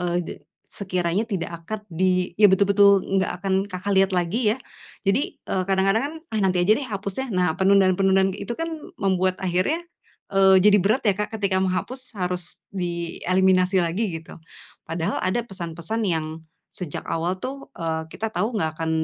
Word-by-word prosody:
eee, 175 0 0
de - - -6 0.4
sekiranya 185 +1 -1
tidak 195 -7 -3
akad 215 +4 -5
di 180 +1 +1
ya 210 - +8
betul-betul 200 0 +5
enggak 190 -1 -1
akan 195 0 +1
Kakak 190 +1 -5
lihat 195 0 +4
lagi 210 +6 +1
ya. - - -12 0.4
Jadi, 195 +8 0
eee, 185 - -1
kadang-kadang 195 +4 +2
kan, 310 - -7 0.2
"Ah, 220 - -1
nanti 185 -3 +2
aja 215 +7 +4
deh 275 - -4
hapusnya." 200 +4 -4
Nah, 180 -3 +1
penundaan-penundaan 190 0 +4
kayak - - -7
itu 235 - -3
kan 330 0 -3 0.2
membuat 185 - +1
akhirnya, 185 - 0 0.5
eee, 190 -1 +5
jadi 205 0 +6
berat 210 +8 +2
ya, - - 0
Kak, 210 +1 -3
ketika 200 -3 0
menghapus 225 +8 -2
harus 180 -2 -4
di 170 -3 -4
eliminasi 185 0 +3
lagi 180 +3 -1
gitu. - - -13 0.5
Padahal 165 +1 -2
ada 190 +6 0
pesan-pesan 185 +2 -4
yang 160 -3 0 0.4
sejak 175 -6 -5
awal 170 +3 0
tuh, 275 +1 -5
eee, 160 -1 -2
kita 225 0 -3
tahu 225 +2 -1
enggak 160 -6 -2
akan 160 0 -1
190 Hz, 170 wpm, -24 LUFS, 180-205 Hz, 0.5 s, ya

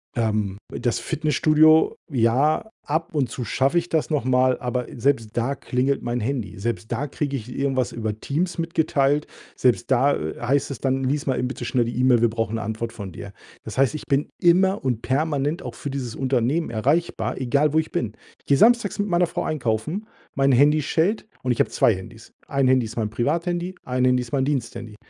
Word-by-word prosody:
Ähm, 105 -4 0
das 120 - -1
Fitnessstudio, 155 +1 +3 0.2
ja, 135 - +2 0.2
ab 160 +3 -2
und 140 -5 0
zu 125 - -5
schaffe 135 +6 +1
ich 170 0 +1
das 160 0 0
noch 150 -6 0
mal, 130 0 +3
aber 125 -1 -2
selbst 120 -3 0
da 125 +4 +1
klingelt 130 +1 -1
mein 120 0 -2
Handy. 115 -4 -3
Selbst 110 +2 -4
da 125 +5 -1
kriege 140 0 -3
ich 120 +2 -8
irgendwas 135 -2 0
über 110 -2 -4
Teams 170 +9 -2
mitgeteilt. 150 -3 +1 0.3
Selbst 120 0 +1
da, 135 +3 +4
äh, 80 +1 -5
heißt 135 +3 +1
es 130 - -6
dann: 135 0 0
„Lies 140 +2 -1
mal 130 - +1
eben 125 - 0
bitte - - -6
schnell 120 -3 +1
die 120 +2 -4
Email, 125 -2 +4
wir 120 - +4
brauchen 115 0 -2
'ne 115 - -3
Antwort 115 +1 -4
von 100 -5 -7
dir.“ - - -9 0.3
Das - - -8
heißt, 135 +2 +3
ich 155 - -5
bin 140 +1 +1
immer 190 +1 +4
und 125 -4 -1
permanent 145 +4 0
auch - - -7
für 145 - -6
dieses 130 -4 -4
Unternehmen 135 +3 0
erreichbar, 155 +10 0
egal 140 +4 +1
wo - - +2
ich 160 - -3
bin. 115 -11 -2 0.3
Ich - - -35
gehe 140 - +4
Samstags 235 0 +4
mit 205 -1 0
meiner 175 0 +3
Frau - - -3
einkaufen, 155 - -2 0.3
mein 135 0 +3
Handy 150 +4 +5
schellt 185 +10 0 0.2
und 125 - +1
ich 120 - -1
habe - - +3
2 115 - +3
Handys. 110 +5 -10 0.2
Ein 135 -2 +1
Handy 130 -2 +3
ist 110 - -8
mein 110 -2 -1
Privathandy, 170 +9 -1
ein 125 0 0
Handy 125 0 +3
ist 120 - -8
mein 135 -1 +1
Diensthandy. 115 -5 -3
135 Hz, 205 wpm, -23 LUFS, 120-150 Hz, 0.3 s, Handy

